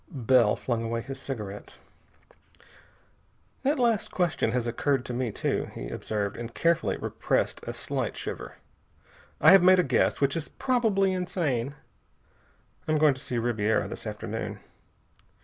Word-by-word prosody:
Bell 125 - +3
flung 120 -3 -2
away 115 0 -2
his 135 +2 -7
cigarette. 105 -7 -6 1.8
"That 280 +3 +1
last 235 -4 +1
question 175 -10 0
has 125 0 0
occurred 130 +2 0
to 125 - -5
me 120 -2 -1
too," - - -1
he - - -6
observed, 100 - -3
and 115 0 -6
carefully 170 0 +1
repressed - - -1
a - - -1
slight - - -3
shiver. - - -6 0.8
"I 160 - +8
have 195 -1 +8
made 185 +1 +7
a 180 - +4
guess, 130 -5 +2
which 140 +1 +2
is 165 -3 -3
probably 225 -7 +1
insane. 155 -8 -1 1.1
I'm 155 0 +2
going 150 -1 +5
to 130 - -11
see 125 - -3
Ribiera 110 -2 +1
this - - -7
afternoon." 110 +1 -5
130 Hz, 145 wpm, -27 LUFS, 115-180 Hz, 1.8 s, I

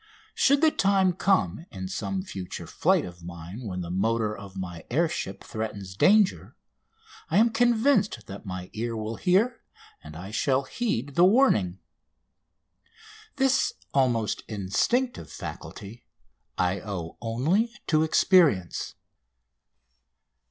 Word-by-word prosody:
Should 280 +1 +3
the 320 -1 +5
time 195 -5 +3
come 170 - +1
in 95 -1 -6
some 190 - -3
future 95 - -7
flight - - +1
of 85 -1 -11
mine 85 +6 -8
when 90 -2 -4
the 85 -1 -5
motor 110 +3 0
of 100 -2 -11
my 90 -3 -6
air 165 +7 +2
ship 95 -10 -5
threatens 100 -4 -5
danger 205 - +3 0.7
I 165 - +2
am 230 +2 +5
convinced 225 - +2
that 100 0 -9
my 90 -3 -7
ear 115 +1 -3
will 110 +1 -4
hear, 215 +6 +2 0.4
and 75 0 -10
I 90 +5 -8
shall 130 +4 +1
heed, 140 - -2
the 170 - +4
warning. 180 - +4 1.6
This 265 -1 +2 0.2
almost 120 -5 +1
instinctive 110 - -1
faculty 115 +4 -8 0.5
I 90 +1 +1
owe 90 -6 -6
only 150 - +1
to 155 -2 +2
experience. 160 - +3
115 Hz, 125 wpm, -26 LUFS, -, 1.6 s, the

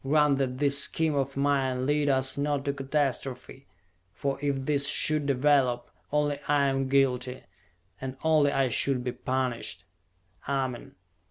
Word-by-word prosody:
Grant 145 0 +3
that 130 -2 -1
this 140 0 +2
scheme 160 +2 +1
of 140 -1 -2
mine 135 -2 0
lead 145 +1 +1
us 130 -1 +2
not 145 -1 -1
to 140 - 0
catastrophe 135 -1 -3 0.5
for 135 +7 -2
if 140 -2 -1
this 140 -1 +3
should 150 0 +1
develop, 130 -3 +2 0.2
only 145 -1 0
I 145 -1 +3
am 135 0 -1
guilty, 130 -2 +1 0.6
and 130 0 -6
only 155 -3 +3
I 135 -2 +1
should 125 +1 0
be 125 - -2
punished!" 125 -8 -3 0.7
"Amen!" 130 -3 -3
135 Hz, 145 wpm, -27 LUFS, 130-145 Hz, 0.7 s, Grant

